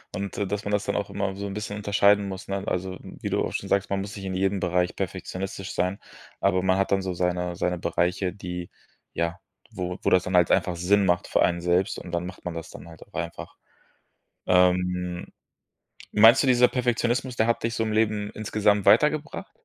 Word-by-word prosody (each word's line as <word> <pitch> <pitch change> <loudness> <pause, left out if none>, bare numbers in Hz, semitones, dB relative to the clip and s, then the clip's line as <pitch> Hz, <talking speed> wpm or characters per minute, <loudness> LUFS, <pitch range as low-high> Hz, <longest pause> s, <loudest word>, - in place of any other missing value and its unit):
Und 100 0 -4
da 100 - 0
dass 100 +1 -3
man 105 - -2
das 105 -1 0
dann - - -1
auch 100 - -2
immer 100 -1 -2
so 100 +1 -5
'n 100 - -5
bisschen 105 0 -5
unterscheiden 100 0 +3
muss, 95 -1 -7
ne? 100 0 -3
Also, 95 +1 -2
wie - - -7
du - - +1
auch - - -4
schon - - -4
sagst: 100 0 +1
„Man 100 0 -1
muss 100 +1 -7
nicht 100 -2 -7
in 95 -1 -3
jedem 95 +1 +1
Bereich 90 0 0
perfektionistisch 95 0 -5
sein.“, 90 +3 -1 0.4
aber 95 -2 +2
man 95 0 +3
hat 95 - 0
dann 100 -1 +3
so 95 -1 -3
seine 90 0 -1
seine 90 +1 -1
Bereiche, 90 +2 0
die, 90 -2 -6 0.4
ja, 85 +1 -2 0.3
wo 90 0 -4
wo - - +3
das 90 - +4
dann 90 - -2
halt 90 -2 +4
einfach 90 - +2
Sinn 95 +4 +2
macht 90 -1 +1
für - - +1
einen 85 0 +1
selbst 90 +2 +1
und 90 - -10
dann 85 +1 -2
macht 90 - -10
man 90 - -3
das 80 0 -7
dann - - -11
halt 80 -2 -14
auch - - -30
einfach. 85 -1 -6 0.9
Ähm, 90 -1 +2 0.8
meinst 115 +6 +7
du, - - +1
dieser 125 -1 +6
Perfektionismus, 125 0 0
der 110 -1 +2
hat 115 - 0
dich 115 0 -1
so 115 - 0
im 110 - -2
Leben 105 -1 +1
insgesamt 105 -1 +1
weitergebracht? 150 +1 +2
95 Hz, 215 wpm, -25 LUFS, 90-105 Hz, 0.9 s, meinst